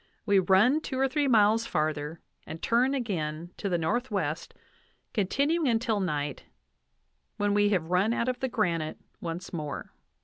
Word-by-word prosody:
We 200 Hz, -2 st, +4 dB
run 195 Hz, -, +4 dB
two 265 Hz, -, -4 dB
or 270 Hz, +1 st, +3 dB
three 290 Hz, +1 st, 0 dB
miles 225 Hz, -1 st, +4 dB
farther, 155 Hz, 0 st, -2 dB, 0.3 s
and 160 Hz, -, -6 dB
turn 250 Hz, +8 st, +2 dB
again 170 Hz, -, -3 dB
to 200 Hz, -, -2 dB
the 175 Hz, -, +1 dB
northwest, 175 Hz, -, -2 dB, 0.6 s
continuing 280 Hz, -, +1 dB
until 225 Hz, -2 st, +1 dB
night, 150 Hz, -6 st, -2 dB, 0.9 s
when 205 Hz, 0 st, +1 dB
we 205 Hz, 0 st, +4 dB
have 180 Hz, -4 st, 0 dB
run 190 Hz, +5 st, +3 dB
out 235 Hz, 0 st, 0 dB
of 255 Hz, -1 st, -1 dB
the 265 Hz, -, -1 dB
granite 170 Hz, -9 st, -1 dB, 0.2 s
once 170 Hz, +2 st, -6 dB
more." 150 Hz, -4 st, -5 dB
205 Hz, 150 wpm, -28 LUFS, 165-240 Hz, 0.9 s, We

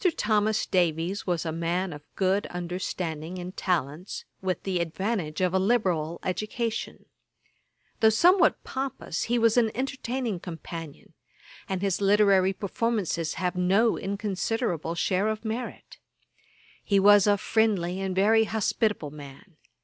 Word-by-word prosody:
Thomas 215 Hz, 0 st, +1 dB
Davies 175 Hz, +2 st, 0 dB
was 175 Hz, -2 st, 0 dB
a 160 Hz, -, -1 dB
man 170 Hz, +2 st, -1 dB
of 145 Hz, -, -9 dB
good 195 Hz, +1 st, +1 dB
understanding 175 Hz, -1 st, -4 dB
and 180 Hz, +1 st, -7 dB
talents, 175 Hz, -1 st, -2 dB, 0.2 s
with 185 Hz, -3 st, -2 dB
the 190 Hz, -2 st, -1 dB
advantage 170 Hz, -1 st, -2 dB
of 180 Hz, -1 st, +1 dB
a 190 Hz, -, +3 dB
liberal 185 Hz, -7 st, +1 dB
education. 215 Hz, +4 st, -3 dB, 0.9 s
Though 220 Hz, -, +6 dB
somewhat 350 Hz, -, +4 dB
pompous, 265 Hz, -10 st, -4 dB
he 240 Hz, +1 st, +1 dB
was 230 Hz, 0 st, +3 dB
an 230 Hz, -2 st, +4 dB
entertaining 255 Hz, -5 st, -2 dB
companion; 165 Hz, -2 st, -8 dB, 0.6 s
and 190 Hz, 0 st, -2 dB
his 195 Hz, -1 st, 0 dB
literary 200 Hz, -2 st, +4 dB
performances 200 Hz, -5 st, -2 dB
have 180 Hz, -1 st, -1 dB
no 195 Hz, +6 st, +3 dB
inconsiderable 200 Hz, -, -2 dB
share 185 Hz, +4 st, +1 dB
of 220 Hz, +1 st, -3 dB
merit. 225 Hz, +3 st, -5 dB, 0.8 s
He 200 Hz, -1 st, +3 dB
was 205 Hz, 0 st, +6 dB
a 205 Hz, 0 st, +4 dB
friendly 195 Hz, -4 st, +1 dB
and 190 Hz, -1 st, -2 dB
very 220 Hz, +3 st, +4 dB
hospitable 215 Hz, -, -1 dB
man. 150 Hz, +5 st, -12 dB
190 Hz, 130 wpm, -27 LUFS, 175-220 Hz, 0.9 s, Though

